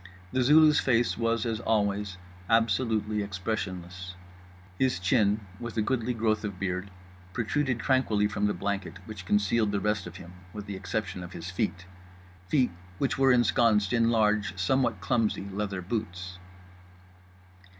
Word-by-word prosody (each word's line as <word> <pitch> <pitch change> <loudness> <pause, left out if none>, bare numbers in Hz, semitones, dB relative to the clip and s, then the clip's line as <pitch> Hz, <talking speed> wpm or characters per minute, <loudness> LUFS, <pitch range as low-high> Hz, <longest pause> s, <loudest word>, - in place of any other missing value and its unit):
The 130 - +1
Zulu's 150 +3 +6
face 120 -2 +2
was 115 0 0
as 115 -2 -1
always 100 -3 0 0.3
absolutely 110 -1 +2
expressionless. 95 -2 -4 0.6
His 130 -7 +2
chin, 100 +3 +2 0.2
with 120 -1 -6
a 110 - +2
goodly 125 +1 -1
growth 110 -1 +1
of 100 -3 -4
beard, 95 0 -2 0.4
protruded 125 +2 0
tranquilly 115 -5 +2
from 105 0 0
the 105 - -1
blanket 100 +1 -3
which 100 -4 -9
concealed 105 +1 +2
the 100 - 0
rest 105 -1 -1
of 90 - -10
him 90 -1 -11 0.2
with 105 -1 -6
the 100 -2 -5
exception 95 0 -3
of 90 0 -8
his 85 +2 -6
feet—feet 95 +3 -3 0.3
which 135 -1 -1
were 135 0 +5
ensconced 115 -4 +3
in 115 -1 +3
large, 105 -4 +2
somewhat 105 +1 +1
clumsy, 105 -2 0
leather 100 -2 -3
boots. 95 -3 -4
105 Hz, 140 wpm, -28 LUFS, 95-115 Hz, 0.6 s, Zulu's